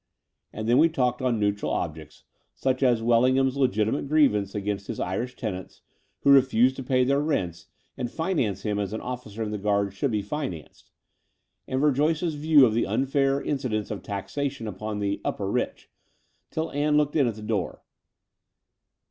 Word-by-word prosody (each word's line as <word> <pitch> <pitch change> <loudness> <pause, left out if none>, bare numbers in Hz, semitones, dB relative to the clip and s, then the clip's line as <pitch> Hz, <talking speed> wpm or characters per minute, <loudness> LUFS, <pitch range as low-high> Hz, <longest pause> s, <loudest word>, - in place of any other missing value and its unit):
And 110 +1 -5
then 120 +3 +4
we 165 +2 +6
talked 125 -5 0
on 125 -3 +1
neutral 100 0 0
subjects, 80 -2 -7 0.3
such 130 0 -1
as 120 -4 +3
Wellingham's 130 +3 +3
legitimate 125 0 +1
grievance 120 -10 +2
against 100 -1 -3
his 115 - -5
Irish 115 +8 -3
tenants, 95 -6 -6 0.4
who 140 - +5
refused 130 -2 +5
to 135 - -5
pay 130 0 +2
their 140 +2 +2
rents 90 - -2 0.3
and 125 -3 -3
finance 125 - -1
him 105 -2 -1
as 100 0 -3
an 110 - -4
officer 120 -3 -5
in 105 - -4
the 105 - -3
Guards 100 -1 0
should 135 +8 -1
be 105 -3 -1
financed, 100 - -6 0.8
and 130 - -1
Verjoyce's 150 +4 +2
views 150 -1 +5
of 115 -4 +4
the 115 - +1
vidair 135 +5 +1
in 145 - 0
cidence 110 -5 -2
of 105 - -4
taxation 130 +6 -4
upon 105 +2 -5
the 100 -1 -2
"upper 100 -1 -2
rich," - - -2 0.6
till 160 +1 -3
Ann 150 +1 +2
looked 150 -1 +1
in 140 -5 +4
at 115 - -2
the 110 - -10
door. 105 -5 -3
120 Hz, 175 wpm, -26 LUFS, 105-140 Hz, 0.8 s, we